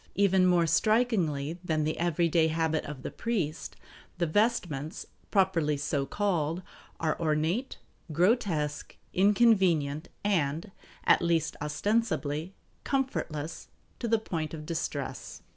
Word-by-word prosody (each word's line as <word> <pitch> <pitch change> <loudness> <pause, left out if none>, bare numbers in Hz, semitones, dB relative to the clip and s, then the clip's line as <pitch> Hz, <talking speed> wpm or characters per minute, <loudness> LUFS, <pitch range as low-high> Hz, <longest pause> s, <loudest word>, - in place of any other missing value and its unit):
Even 190 -2 +4
more 175 -2 +4
strikingly 170 - +1
than 155 -3 0
the 155 +1 -2
everyday 170 -1 +2
habit 160 0 0
of 145 -3 -7
the - - -4
priest, 185 -10 -3 0.4
the 170 - +1
vestments, 170 - 0 0.2
properly 170 -7 +2
so 140 -1 -1
called, 175 -4 -1 0.4
are 155 -2 0
ornate, 165 - 0 0.3
grotesque, 170 - 0 0.2
inconvenient, 185 -7 +3
and, 170 -2 0 0.3
at - - +5
least 170 -2 +1
ostensibly, 165 -1 -1 0.3
comfortless 170 - -2 0.3
to 235 - -2
the 225 0 +3
point 165 -7 -4
of 150 -1 -8
distress. 165 0 -4
170 Hz, 110 wpm, -29 LUFS, 155-200 Hz, 0.4 s, at